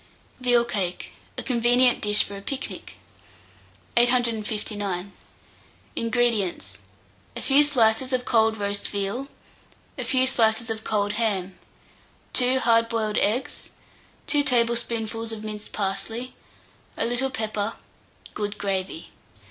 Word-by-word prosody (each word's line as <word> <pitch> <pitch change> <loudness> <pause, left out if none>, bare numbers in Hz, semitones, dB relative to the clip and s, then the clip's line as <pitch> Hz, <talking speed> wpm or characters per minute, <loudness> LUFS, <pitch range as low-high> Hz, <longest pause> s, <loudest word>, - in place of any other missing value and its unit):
VEAL 245 -2 +3
CAKE 185 -6 -3 0.3
(a - - -3
Convenient 245 0 +3
Dish 210 0 +4
for 200 - -8
a 200 - -8
Picnic). 270 +6 -5 1.0
859. 215 -5 0 0.8
INGREDIENTS. 215 - 0 0.6
A - - -5
few 275 +2 +5
slices 255 -3 +3
of 250 -1 0
cold 220 -2 +3
roast 200 0 -2
veal, 205 +7 -3 0.7
a - - -1
few 260 -1 +3
slices 225 -2 +2
of 220 0 -5
cold 205 -1 0
ham, 190 -4 -1 0.7
2 255 +1 +4
hard 230 0 +4
boiled 220 -2 -1
eggs, 225 +6 -1 0.6
2 290 - +3
tablespoonfuls 235 -3 0
of 220 -1 -6
minced 215 -1 -7
parsley, 225 +5 -3 0.6
a - - +1
little 245 +3 +1
pepper, 215 -2 -2 0.6
good 210 0 -4
gravy. 190 -4 -3
225 Hz, 115 wpm, -25 LUFS, 205-245 Hz, 1.0 s, few